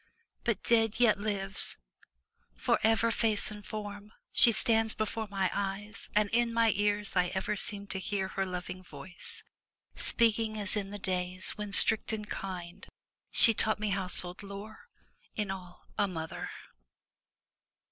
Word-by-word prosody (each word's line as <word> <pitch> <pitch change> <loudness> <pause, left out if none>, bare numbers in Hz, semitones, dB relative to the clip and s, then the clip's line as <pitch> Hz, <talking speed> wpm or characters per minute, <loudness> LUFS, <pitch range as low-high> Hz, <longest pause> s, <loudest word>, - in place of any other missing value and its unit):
But 230 -5 -1
dead 225 -1 +3
yet 230 -4 +4
lives— 200 -2 +1 0.8
for, - - +1
ever, 225 +1 +3
face 220 -2 +1
and 210 -1 -9
form. 205 0 -7 0.2
She 235 - +7
stands 225 -1 +3
before 215 0 -2
my 195 -2 0
eyes; 200 +1 -4
and 210 0 +4
in 235 +1 +2
my 230 -1 +3
ears 205 0 0
I 180 0 +3
ever 190 +2 -1
seem 200 0 0
to 190 - -2
hear 190 0 -2
her 195 - -2
loving 180 0 -5
voice 180 0 -11 0.5
Speaking 220 -1 +1
as 200 0 -3
in 200 -2 -2
the 205 - -6
days 185 -1 -2
when, 210 -1 -6
strict 220 +2 +5
and 210 -1 -4
kind. 185 -1 -6 0.4
She 230 - +6
taught 215 0 +1
me 215 0 -2
household 180 -2 +1
lore 205 - -10 0.2
— - - -36
in 210 -3 -2
all 180 -2 -9
a 205 - +3
mother. 160 -4 -5
205 Hz, 150 wpm, -30 LUFS, 190-220 Hz, 0.8 s, She